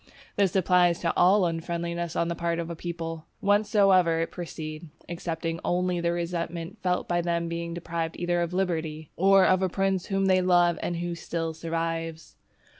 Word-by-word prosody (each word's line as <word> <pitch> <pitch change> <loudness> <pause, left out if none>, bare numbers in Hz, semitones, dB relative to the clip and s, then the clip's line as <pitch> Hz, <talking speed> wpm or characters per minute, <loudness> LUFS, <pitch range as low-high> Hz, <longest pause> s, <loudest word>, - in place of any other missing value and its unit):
This 200 -2 +2
applies 180 -2 +4
to 170 - 0
all 190 +2 +5
unfriendliness 170 0 -3
on 170 - +1
the 170 - -1
part 170 0 -1
of 170 0 -4
a - - -5
people, 165 -1 -5
whencesoever 195 -5 +3
it 165 - -2
proceed, 155 -2 -7 0.2
excepting 165 -1 -3
only 180 0 0
the 170 0 +1
resentment 170 -1 -4
felt 180 -1 0
by 175 0 +1
them 170 0 0
on 170 - -4
being 170 0 -4
deprived 165 -1 -4
either 175 0 0
of 170 0 -1
liberty, 160 -4 -2
or 195 +1 +5
of 185 0 +3
a 190 - +1
prince 195 0 0
whom 195 -1 0
they 185 -1 +4
love 175 -2 +3
and 175 - -2
who 175 0 -3
still 165 -1 -3
survives. 165 0 -4
170 Hz, 180 wpm, -27 LUFS, 165-180 Hz, 0.2 s, all